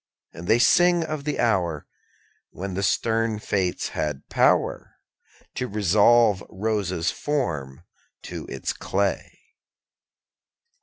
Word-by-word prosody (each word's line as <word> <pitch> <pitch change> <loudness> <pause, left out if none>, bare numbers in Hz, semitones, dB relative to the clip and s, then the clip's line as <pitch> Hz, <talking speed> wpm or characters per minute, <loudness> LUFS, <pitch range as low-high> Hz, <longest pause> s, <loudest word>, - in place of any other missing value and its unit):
And 85 +2 -9
they 110 - +5
sing 175 +7 +4
of 155 -3 -5
the 150 - -2
hour 90 -9 0 0.6
When 95 +1 -6
the 95 - -2
stern 115 +2 0
fates 95 -4 -1
had 75 -3 -4
power - - +1 0.6
To 125 - -3
resolve 105 +1 +3
Rosa's 95 -4 -1
form 80 - -3 0.4
to - - -7
its - - -4
clay. 100 0 -2
100 Hz, 105 wpm, -24 LUFS, 90-120 Hz, 0.6 s, they